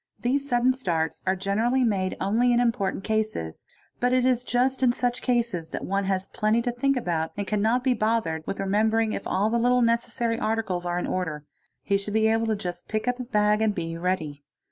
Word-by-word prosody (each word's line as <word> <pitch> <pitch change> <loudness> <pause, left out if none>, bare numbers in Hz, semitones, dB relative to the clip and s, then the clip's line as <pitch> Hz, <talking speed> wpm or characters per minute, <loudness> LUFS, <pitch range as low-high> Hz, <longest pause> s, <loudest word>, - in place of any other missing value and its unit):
These 275 +3 -1
sudden 245 +1 +3
starts 170 -11 -2
a 190 - +3
generally 220 +7 +1
made 195 -5 0
only 225 +6 +2
in 240 - +3
important 225 -6 0
cases, 215 - -2 0.3
but 245 +1 +2
it 255 0 +3
is 250 -1 +2
just 255 +2 0
in 255 -2 +5
such 245 +1 -1
cases 235 -10 -1
th - - -5
one 195 +1 -1
has 190 -1 -1
plenty 215 +3 +1
to 245 - 0
think 275 +3 +1
about 165 -8 -1
and 205 - -2
cannot 220 +5 +1
be 260 -1 +3
bothered 215 -8 0
with - - -3
rememberti 215 +3 +1
if - - -4
all 205 +3 +1
the 235 - +2
little 245 +1 +3
necessary 230 0 0
articles 210 -6 -1
are 175 0 -1
in 180 - -1
order; 160 -5 -3 0.4
he 200 - +2
should 205 +1 -5
be 220 0 +4
able 225 0 +1
just 180 -3 -6
take 215 +2 -2
up 250 0 0
his 250 - -5
bag 210 -2 +2
and 215 -2 +1
be 165 -1 -3
ready. 165 -5 -2
220 Hz, 210 wpm, -25 LUFS, 190-245 Hz, 0.4 s, in